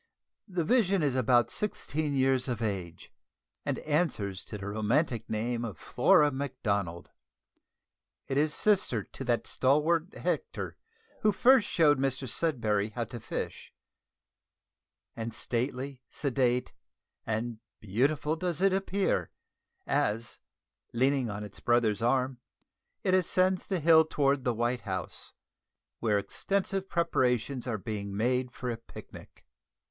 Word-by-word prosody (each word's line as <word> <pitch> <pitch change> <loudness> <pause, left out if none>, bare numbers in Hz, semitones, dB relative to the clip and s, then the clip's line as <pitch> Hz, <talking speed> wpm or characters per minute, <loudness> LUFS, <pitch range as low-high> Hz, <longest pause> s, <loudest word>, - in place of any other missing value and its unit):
The 180 -4 -1
vision 195 -4 +3
is 140 -3 +2
about 120 -2 +3
sixteen 155 -8 -2
years 130 -1 +2
of 120 -4 -2
age, 95 -7 -4 0.5
and - - -1
answers 140 - -1
to 105 - -6
the 100 - -7
romantic 110 +4 0
name 115 +2 -1
of 105 -8 -5
Flora 150 - +4
Macdonald. 100 -10 -2 1.2
It 135 - -2
is 150 +2 +2
sister 185 - +2
to 135 - -9
that 120 -2 0
stalwart 160 +7 +2
Hector 470 - -3 0.5
who 215 - +4
first 245 +1 +5
showed 150 -5 +4
Mr 135 0 -1
Sudberry 110 -8 0
how 120 - -1
to 120 +1 -7
fish; 110 - -5 1.4
and 115 -1 -5
stately, 130 +3 -2
sedate, 125 -3 0 0.5
and 110 +1 -2 0.2
beautiful 140 +9 0
does 175 -1 -2
it 195 0 +4
appear, 195 0 0 0.6
as, 110 +2 -1 0.5
leaning 130 0 +2
on 105 0 -4
its 105 -1 -9
brother's 115 -4 +2
arm, 130 +1 +1 0.6
it 185 - +2
ascends 185 0 +2
the 190 -3 0
hill 160 0 +7
towards 140 -3 +1
the 125 -2 0
White 120 +2 0
House, 95 -3 -4 0.7
where 105 -3 +2
extensive 195 - -2
preparations 130 -6 0
are 115 -3 -1
being 100 -1 -5
made 125 +3 +1
for 125 0 -4
a 115 - -4
picnic. 115 - -13
130 Hz, 125 wpm, -30 LUFS, 115-155 Hz, 1.4 s, hill